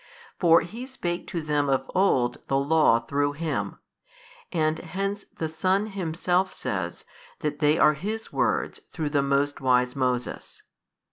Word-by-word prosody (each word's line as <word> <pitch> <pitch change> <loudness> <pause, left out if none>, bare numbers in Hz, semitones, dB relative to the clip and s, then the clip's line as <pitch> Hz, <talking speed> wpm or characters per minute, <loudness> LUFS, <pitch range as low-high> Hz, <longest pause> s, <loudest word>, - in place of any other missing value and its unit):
For 165 -2 +6
He 230 +9 -7
spake 175 -10 -4
to 170 - -3
them 145 -2 +1
of 135 -1 +1
old 130 -11 +2
the 135 - +2
Law 145 -3 +4
through 145 +5 -1
Him; 160 +1 -3 0.7
and 155 -2 +1
hence 195 +4 -3
the 160 - -1
Son 185 +6 +1
Himself 185 -1 0
says - - -4 0.4
that 150 -2 -2
they 150 0 +4
are 150 - +6
His 215 +9 -5
Words - - 0
through 155 -3 -2
the 145 -1 +3
most 140 +1 0
wise 125 -1 +3
|207 - - -23
Moses. 125 -2 -2
155 Hz, 150 wpm, -26 LUFS, 140-180 Hz, 0.7 s, For